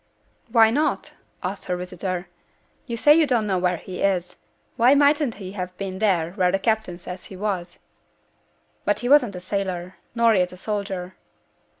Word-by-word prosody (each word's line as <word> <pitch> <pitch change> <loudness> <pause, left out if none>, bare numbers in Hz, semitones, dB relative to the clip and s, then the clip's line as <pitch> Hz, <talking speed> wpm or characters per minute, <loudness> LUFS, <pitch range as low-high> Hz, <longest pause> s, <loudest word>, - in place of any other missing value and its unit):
'Why 225 -2 +6
not?' 295 +6 0 0.3
asked - - -4
her 180 - -2
visitor; 180 0 -4 0.6
'you 235 -2 -3
say 295 +6 +6
you 315 -1 +4
don't 240 -4 +1
know 190 -3 0
where 180 -1 +1
he 180 +2 -8
is; 180 -2 0 0.4
why 245 +4 +5
mightn't 285 -3 +3
he 190 -2 -8
have 180 -2 -6
been 190 -1 -5
there 180 -6 +1
where 180 -2 +1
the 195 - +2
captain 220 -3 -1
says 180 +1 -8
he 190 - -10
was?' 185 -3 -3 1.1
'But - - 0
he 245 - -2
wasn't 255 -9 +5
a - - -5
sailor, 185 -1 -4 0.2
nor 230 -1 +4
yet 180 -3 +2
a - - -11
soldier.' 195 -2 -4
195 Hz, 175 wpm, -23 LUFS, 180-225 Hz, 1.1 s, Why